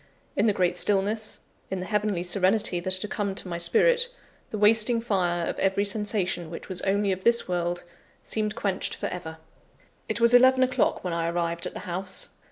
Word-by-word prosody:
In 210 - +2
the - - +5
great 180 -2 +1
stillness, 205 +3 0 0.3
in 190 - -3
the 180 - -4
heavenly 210 -4 -1
serenity 185 +1 +1
that 185 +1 -1
had 210 +2 -6
come 200 -2 -2
to 195 - -4
my 170 -1 -4
spirit, 485 - +3 0.4
the 215 - -4
wasting 225 +3 +4
fire 180 -6 0
of - - -4
every 195 +1 +1
sensation 200 -5 -1
which 165 - -8
was 185 -1 -4
only 200 +1 +1
of 185 0 -3
this 235 0 +4
world, 175 -1 -2 0.4
seemed 215 -1 -2
quenched 195 -2 -2
for - - -5
ever. 160 -3 -7 0.7
It - - -1
was 235 +1 +4
eleven 260 +1 +6
o'clock 255 0 +1
when 180 -2 -2
I 165 0 -1
arrived 170 0 -1
at - - -8
the - - -7
house. 185 0 -3
195 Hz, 190 wpm, -26 LUFS, 175-215 Hz, 0.7 s, eleven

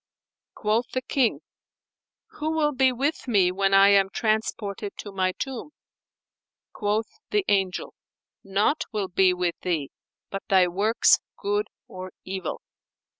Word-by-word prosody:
Quoth 220 +3 0
the 255 - -1
King, 260 -3 +1 1.0
"Who 305 +1 -1
will 305 -2 +2
be 260 -1 +3
with 270 +4 -2
me 195 -6 +3
when 195 +1 +1
I 195 0 +7
am 195 -1 +5
transported 215 -2 -2
to 205 - -7
my 185 -1 +1
tomb?" 270 +5 -6 1.0
Quoth 215 +1 -2
the 415 -2 +1
Angel, 190 -2 0 0.5
"Naught 200 +10 +1
will 205 -4 -2
be 185 0 +4
with 180 -1 -1
thee 160 -6 -2 0.4
but 195 - -3
thy 185 -2 +5
works 205 +6 +3 0.2
good 415 +1 -1 0.2
or 185 0 -8
evil." 190 -3 -4
205 Hz, 130 wpm, -25 LUFS, 190-250 Hz, 1.0 s, I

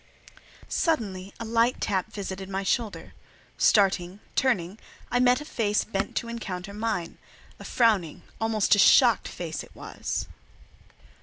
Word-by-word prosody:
Suddenly 200 - -1
a 230 - -5
light 230 +2 +2
tap 200 +1 -1
visited 195 -2 -6
my 195 0 -2
shoulder. 220 +2 -2 0.5
Starting, 195 -2 +3 0.2
turning, 205 -6 0 0.3
I 245 - +2
met 250 +2 +4
a - - -8
face 210 -7 0
bent 195 -3 -3
to 235 - -2
encounter 200 -5 -6
mine; 210 -5 -3 0.4
a - - -9
frowning, 210 -10 +1 0.2
almost 225 -2 +2
a 205 - +4
shocked 235 +1 +6
face 165 -2 -5
it - - -17
was. - - -4
210 Hz, 135 wpm, -26 LUFS, 190-230 Hz, 0.5 s, shocked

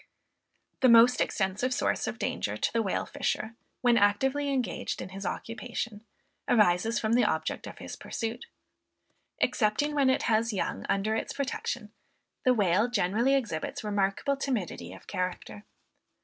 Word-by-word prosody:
The 260 - +5
most 235 +2 +7
extensive 205 +6 0
source 250 - 0
of - - -3
danger - - -2
to - - -1
the 230 - +2
whale 195 -4 -1
fisher, 220 +1 -2 0.3
when 240 -1 +4
actively 265 +8 +2
engaged 255 -3 -2
in 180 - -6
his 195 0 -5
occupation, 230 -2 -5 0.5
arises 210 0 +3
from 220 0 0
the 245 +1 +4
object 160 -7 -1
of - - -9
his - - -7
pursuit. 230 +1 -5 0.9
Excepting 235 +7 +1
when 280 -3 +3
it 260 - +2
has 225 0 +2
young 195 - -3
under 200 +2 +1
its - - -3
protection, 245 -5 -3 0.5
the 255 - +5
whale 205 +2 +3
generally 230 +5 +2
exhibits 220 -12 -2
remarkable 205 +6 0
timidity 210 - -3
of 95 - -12
character. 180 - -4
220 Hz, 145 wpm, -29 LUFS, 195-245 Hz, 0.9 s, most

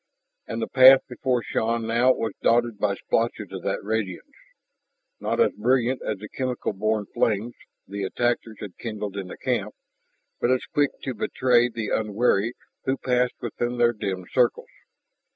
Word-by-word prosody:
And - - -3
the - - -2
path 130 0 +8
before 125 -1 -1
Shann 115 0 -1
now 120 +3 +4
was 110 -4 -3
dotted 120 -2 +2
by 100 -2 +1
splotches 110 -2 -1
of 95 -1 -6
that 95 - -2
radiance, 110 - -3 0.9
not - - -2
as 470 - +4
brilliant 130 0 +1
as 105 - -3
the 105 +2 -9
chemical 125 -1 -3
born 110 +1 0
flames 110 +2 0 0.3
the 100 +1 -5
attackers 115 +2 -1
had 100 -4 -8
kindled 105 -3 -5
in 100 -2 -4
the - - -9
camp, - - -2 0.6
but 120 - +1
as 130 0 +1
quick 145 -1 +1
to 130 - -2
betray 120 +2 +2
the 115 -2 -4
unwary 110 +1 +1 0.3
who 135 +1 +1
passed 125 -1 +1
within 120 +1 -2
their 120 0 +4
dim 95 -4 -4
circles. 125 -2 +1
115 Hz, 160 wpm, -25 LUFS, 105-125 Hz, 0.9 s, path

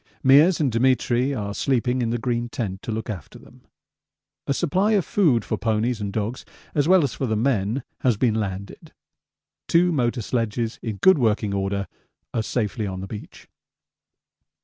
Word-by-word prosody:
Meares 150 +7 +6
and 145 -5 +1
Demetri 125 +2 +2
are 105 -6 -3
sleeping 125 +1 0
in 115 - 0
the 120 - 0
green 120 0 -2
tent 105 -8 -4
to - - -5
look 110 +1 -4
after 95 -9 -7
them. - - -18 0.9
A - - 0
supply 190 +8 +1
of 200 -5 +2
food 145 - +2
for - - -2
ponies 110 +1 0
and 100 -1 -3
dogs 110 +4 -3 0.3
as 145 -1 +1
well 185 -2 +5
as 140 - -1
for 135 - -3
the 110 - 0
men 110 0 0 0.2
has 125 -5 +2
been 120 -1 +2
landed. 100 -3 -5 0.7
Two 175 +1 +4
motor 120 -5 0
sledges 115 0 -2
in 110 -3 -4
good 190 - +5
working 110 -3 +1
order 100 0 -1 0.5
are 115 - 0
safely 110 -1 -2
on 95 -1 -5
the - - -5
beach. 105 +1 -10
120 Hz, 170 wpm, -23 LUFS, 105-135 Hz, 0.9 s, Meares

